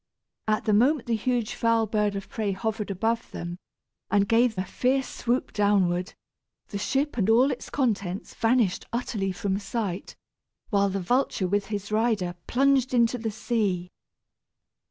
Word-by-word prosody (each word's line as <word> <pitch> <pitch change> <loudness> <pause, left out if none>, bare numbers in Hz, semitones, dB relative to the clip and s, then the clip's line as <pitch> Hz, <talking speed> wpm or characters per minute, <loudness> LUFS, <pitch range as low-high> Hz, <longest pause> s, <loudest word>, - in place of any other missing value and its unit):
At 215 0 +1
the 215 - +2
moment 255 +6 +3
the 235 - +1
huge 240 0 -1
foul 230 -1 +2
bird 210 -1 0
of 195 -1 -5
prey 215 -6 -2
hovered 215 +1 -3
above 225 +5 -1
them 175 +1 -6 0.5
and 200 -1 +3
gave 230 -1 +3
a 185 - -1
fierce 260 +7 0
swoop 245 +2 -1
downward, 190 -3 +1 0.5
the 200 - -4
ship 275 +6 0
and 205 +1 +2
all 250 +5 +5
its 255 - -6
contents 205 -8 -1
vanished 225 -5 +1
utterly 225 -5 -2
from 195 0 -2
sight, 200 -2 -4 0.6
while 200 -1 +3
the 195 +1 -2
vulture 210 -1 +1
with 200 +1 0
his 205 0 -4
rider 215 -5 +1
plunged 265 0 +3
into 240 +1 +3
the 225 0 -2
sea. 205 -5 -1
215 Hz, 155 wpm, -26 LUFS, 195-240 Hz, 0.6 s, all